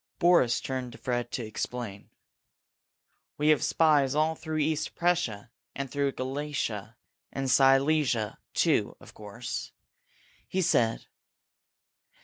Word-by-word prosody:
Boris 170 -10 +4
turned 130 -2 -4
to - - -11
Fred 120 -1 -2
to 120 - -3
explain. 110 -1 -5 1.3
"We 150 +1 +2
have 155 - +4
spies 145 -4 +3
all 155 +1 +2
through 160 0 -5
East 155 0 -1
Prussia, 160 -12 0 0.2
and 135 -2 -4
through 140 -1 0
Galicia 130 -6 -4 0.3
and 135 -1 -2
Silesia, 135 -4 +3 0.2
too, - - +2
of - - -15
course," 110 +4 -6 0.8
he 190 0 0
said. 115 -7 +2
135 Hz, 115 wpm, -28 LUFS, 120-155 Hz, 1.3 s, Boris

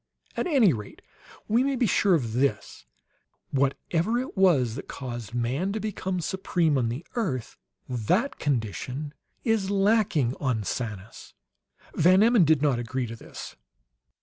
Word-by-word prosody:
"At - - -1
any 255 - +4
rate, 105 -3 -8 0.4
we 230 +4 +3
may 275 0 0
be 245 - +2
sure 195 -2 +3
of 120 -8 -2
this: 115 - -1 0.6
whatever 160 - 0
it 255 +2 -4
was 160 - +3
that 135 - -7
caused 120 -4 -6
man 130 +11 -1
to 220 - -2
become 190 -3 -3
supreme 170 -3 0
on 120 -4 +1
the 125 +8 -5
earth, 150 - -2 0.3
that 130 - 0
condition 130 +3 -2 0.3
is 220 -4 +1
lacking 195 - +2
on 125 -6 0
Sanus!" 105 -1 -6 0.6
Van 185 +4 +5
Emmon 230 -6 +5
did 155 -2 +3
not 135 -5 +2
agree 125 +2 -2
to 115 0 -7
this. - - -10
150 Hz, 145 wpm, -26 LUFS, 120-195 Hz, 0.6 s, Van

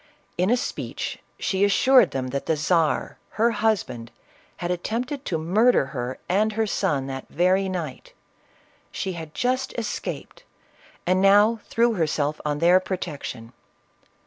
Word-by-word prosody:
In 180 +3 +1
a 245 - +4
speech, - - -4 0.2
she 190 0 0
assured 245 +3 +5
them 130 -1 -3
that 140 +1 -4
the 160 - +2
Czar, 160 0 +1 0.2
her 230 +2 +3
husband, 205 - -1 0.5
had 175 0 -3
attempted 245 +10 -3
to 165 - -1
murder 195 - +3
her 125 -1 -4
and 210 +4 +2
her 220 +1 +1
son 145 -9 0
that 135 -1 -6
very 185 +3 +2
night; 165 -8 -5
that - - -20 0.8
she 190 -1 -2
had 160 -2 -8
just 255 +1 -1
escaped, 225 -3 -5 0.6
and 185 +1 +2
now 205 +3 +5
threw 235 0 +2
herself 155 -4 -1
on 150 -1 -1
their 175 +4 +5
protection. 150 -11 -6
185 Hz, 145 wpm, -24 LUFS, 150-220 Hz, 0.8 s, assured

